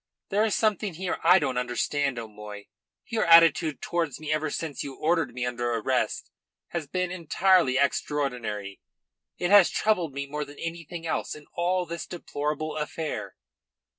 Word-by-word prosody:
"There 205 Hz, +2 st, +2 dB
is 220 Hz, -2 st, +1 dB
something 210 Hz, -4 st, 0 dB
here 180 Hz, +2 st, -3 dB
I 175 Hz, +3 st, +7 dB
don't 135 Hz, -7 st, 0 dB
understand, 130 Hz, +2 st, -1 dB
O'Moy. 105 Hz, -2 st, -8 dB, 0.4 s
Your 225 Hz, -2 st, -1 dB
attitude 165 Hz, -3 st, +5 dB
towards 165 Hz, -6 st, -1 dB
me 155 Hz, -1 st, -4 dB
ever 155 Hz, 0 st, 0 dB
since 145 Hz, -3 st, -4 dB
you 135 Hz, -1 st, -7 dB
ordered 165 Hz, +1 st, +1 dB
me 125 Hz, +1 st, -3 dB
under 120 Hz, -1 st, -1 dB
arrest 115 Hz, -, -1 dB, 0.4 s
has 165 Hz, -4 st, -4 dB
been 180 Hz, +4 st, -1 dB
entirely 180 Hz, -4 st, +3 dB
extraordinary. 125 Hz, -8 st, -1 dB, 0.6 s
It 175 Hz, +1 st, -1 dB
has 205 Hz, -3 st, +8 dB
troubled 180 Hz, -9 st, +1 dB
me 140 Hz, 0 st, -2 dB
more 150 Hz, +2 st, -4 dB
than 145 Hz, 0 st, -12 dB
anything 165 Hz, 0 st, -6 dB
else 160 Hz, -, -2 dB
in 150 Hz, -1 st, -13 dB
all 180 Hz, +1 st, 0 dB
this 170 Hz, -1 st, -6 dB
deplorable 155 Hz, -2 st, -3 dB
affair." 150 Hz, -9 st, -4 dB
155 Hz, 155 wpm, -27 LUFS, 135-175 Hz, 0.6 s, has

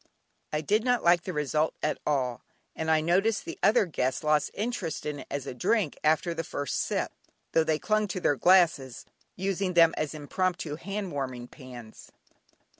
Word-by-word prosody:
I 150 Hz, -, -1 dB
did 210 Hz, +9 st, +1 dB
not 245 Hz, -1 st, +1 dB
like 175 Hz, 0 st, +4 dB
the 185 Hz, -, -3 dB
result 150 Hz, 0 st, 0 dB
at 155 Hz, -, 0 dB
all, 130 Hz, -4 st, 0 dB, 0.3 s
and 160 Hz, 0 st, -3 dB
I 160 Hz, -1 st, +4 dB
noticed 195 Hz, +7 st, +1 dB
the 165 Hz, -, -7 dB
other 210 Hz, +2 st, +4 dB
guests 130 Hz, -4 st, -2 dB
lost 150 Hz, -1 st, +2 dB
interest 205 Hz, -7 st, -3 dB
in 150 Hz, -1 st, -3 dB
it -, -, -10 dB
as 140 Hz, -1 st, -4 dB
a -, -, -5 dB
drink 175 Hz, -, +1 dB
after 155 Hz, +2 st, +2 dB
the 165 Hz, -, -3 dB
first 145 Hz, -3 st, -3 dB
sip, -, -, -1 dB, 0.4 s
though 165 Hz, -, +4 dB
they 160 Hz, -1 st, +1 dB
clung 215 Hz, +4 st, +1 dB
to 185 Hz, -, -3 dB
their 145 Hz, -, +2 dB
glasses, 165 Hz, -7 st, +3 dB, 0.3 s
using 190 Hz, 0 st, -1 dB
them 165 Hz, -1 st, +6 dB
as 155 Hz, 0 st, -2 dB
impromptu 165 Hz, +1 st, -2 dB
hand 195 Hz, +2 st, -4 dB
warming 130 Hz, -3 st, -4 dB
pans. 125 Hz, -5 st, -12 dB
160 Hz, 180 wpm, -28 LUFS, 145-185 Hz, 0.4 s, them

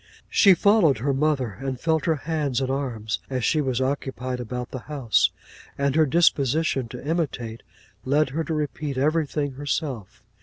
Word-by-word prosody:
She 195 Hz, -2 st, +6 dB
followed 200 Hz, -, +4 dB
her 135 Hz, +5 st, 0 dB
mother, 135 Hz, -7 st, 0 dB
and 135 Hz, -2 st, -3 dB
felt 160 Hz, +1 st, +1 dB
her 160 Hz, -, +2 dB
hands 150 Hz, -4 st, -1 dB
and 130 Hz, -1 st, -1 dB
arms, 120 Hz, -6 st, -2 dB
as 130 Hz, -3 st, -1 dB
she 155 Hz, -, +2 dB
was 130 Hz, -3 st, -1 dB
occupied 130 Hz, -1 st, -2 dB
about 125 Hz, 0 st, -5 dB
the 130 Hz, -, -5 dB
house; 135 Hz, -7 st, +2 dB, 0.5 s
and 140 Hz, 0 st, 0 dB
her 160 Hz, -1 st, +4 dB
disposition 145 Hz, -3 st, +2 dB
to 125 Hz, +4 st, -9 dB
imitate, 135 Hz, -9 st, -2 dB, 0.4 s
led 145 Hz, +2 st, +2 dB
her 160 Hz, +5 st, -2 dB
to 165 Hz, -, -2 dB
repeat 150 Hz, -2 st, -3 dB
everything 150 Hz, 0 st, 0 dB
herself. 130 Hz, -, -4 dB
140 Hz, 160 wpm, -24 LUFS, 125-155 Hz, 0.5 s, She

